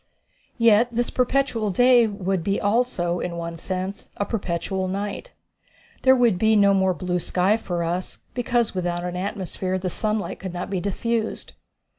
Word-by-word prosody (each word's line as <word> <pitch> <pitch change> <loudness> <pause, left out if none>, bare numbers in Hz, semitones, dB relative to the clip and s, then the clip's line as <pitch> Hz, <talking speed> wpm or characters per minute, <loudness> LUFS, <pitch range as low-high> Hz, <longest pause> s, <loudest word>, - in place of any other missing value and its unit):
Yet 230 -1 +5
this 240 +1 -1
perpetual 250 -4 +1
day 245 +3 +5
would 195 -4 -2
be 200 +3 0
also, 205 -6 0
in 170 -1 -4
one 170 0 -4
sense, 185 +3 -4
a 205 - 0
perpetual 190 -2 -2
night. 200 - -4 0.7
There 260 0 +6
would 235 -7 +3
be 220 +1 +4
no 200 -1 +5
more 190 -1 +2
blue 180 -1 -1
sky 185 +4 +2
for 175 -6 -3
us, 175 +2 -3 0.2
because 240 -2 0
without 175 -2 -2
an 180 0 -4
atmosphere 190 -1 -3
the 185 -1 -3
sunlight 215 +1 -2
could 185 -2 -6
not 175 - -5
be 190 - 0
diffused. 220 +4 -2
195 Hz, 160 wpm, -24 LUFS, 180-225 Hz, 0.7 s, There